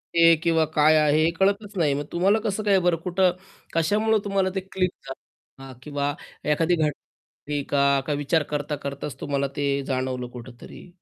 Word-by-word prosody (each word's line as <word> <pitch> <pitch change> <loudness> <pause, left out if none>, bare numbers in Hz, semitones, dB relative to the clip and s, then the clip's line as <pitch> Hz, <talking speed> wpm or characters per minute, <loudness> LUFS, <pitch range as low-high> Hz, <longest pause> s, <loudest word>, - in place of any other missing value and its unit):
हे 165 0 +7
किंवा 165 -2 +3
काय 155 +1 +5
आहे 150 0 +3
हे 160 - +3
कळतच 200 +2 +1
नाही 150 -5 +2
मग 145 +1 -3
तुम्हाला 195 +5 +2
कसं 215 0 -1
काय 200 -2 +4
बरं 175 -2 +2
कुठं, 185 0 +2 0.4
कशामुळं 210 +7 +2
तुम्हाला 195 -2 0
ते - - +1
क्लिक 190 -1 -1 0.2
झालं. 135 0 -13
हां. 135 -1 -10
किंवा 145 -1 -2 0.4
एखादी 165 +3 +2
घटना 150 -1 -4 0.5
का 150 - 0
विचार 145 +2 +1
करता 150 0 -2
करताच 140 0 -6
तुम्हाला 140 -1 -1
ते 140 -1 0
जाणवलं 130 -2 -2
कुठेतरी. 120 +8 -12
155 Hz, 165 wpm, -24 LUFS, 145-185 Hz, 0.5 s, हे